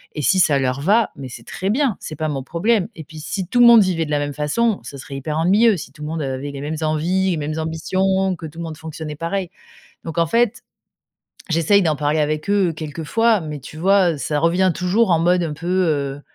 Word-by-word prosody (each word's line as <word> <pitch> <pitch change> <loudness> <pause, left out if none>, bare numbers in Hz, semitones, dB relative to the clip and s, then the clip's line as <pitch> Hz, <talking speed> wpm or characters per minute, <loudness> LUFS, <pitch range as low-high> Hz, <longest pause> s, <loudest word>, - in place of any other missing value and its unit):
et 150 - -3
si 190 +7 +3
ça 150 -6 +4
leur 130 0 -1
va, 210 +6 +3
mais 135 - -7
c'est 120 -1 -10
très 190 - -4
bien, 250 0 +1
c'est 155 - -7
pas 155 +1 -2
mon 135 -2 -3
problème 190 - 0
et 160 - -8
puis 155 +1 -12
si 190 +5 -4
tout 245 - 0
le 240 - +8
monde 235 -2 +9
vivait 170 -4 0
de 150 - -7
la 145 - +1
même 145 0 -3
façon, 190 +10 0
ce - - -9
serait 135 +1 -9
hyper 150 +3 -3
ennuyeux 205 +7 +4
si 145 -6 -8
tout 150 - -16
le 150 - -4
monde 160 +1 -3
avait 135 0 -4
les 140 -1 -7
mêmes 155 +2 -4
envies, 175 +5 +1
les 165 - -1
mêmes 155 +1 -3
ambitions, 190 +4 0
que - - -8
tout 160 +1 -9
le - - -4
monde 160 -2 -6
fonctionnait 160 -1 -7
pareil, 175 +2 -3 0.5
donc 165 0 -7
en 170 - +3
fait, 230 +6 +1 0.9
j'essaie 165 +5 +3
d'en 160 -3 +1
parler 150 +2 0
avec 155 +4 -1
eux 195 -5 +2
quelques 155 0 -6
fois, 225 +5 +2
mais 150 -3 -6
tu 155 - -11
vois, 185 +1 +3
heu, 150 - -7
ça 150 +1 -1
revient 175 +3 +2
toujours 190 +2 +2
en 160 - +3
mode 175 +1 +2
un 160 - -3
peu, 160 +4 -8
heu 150 -7 0
165 Hz, 245 wpm, -20 LUFS, 150-190 Hz, 0.9 s, monde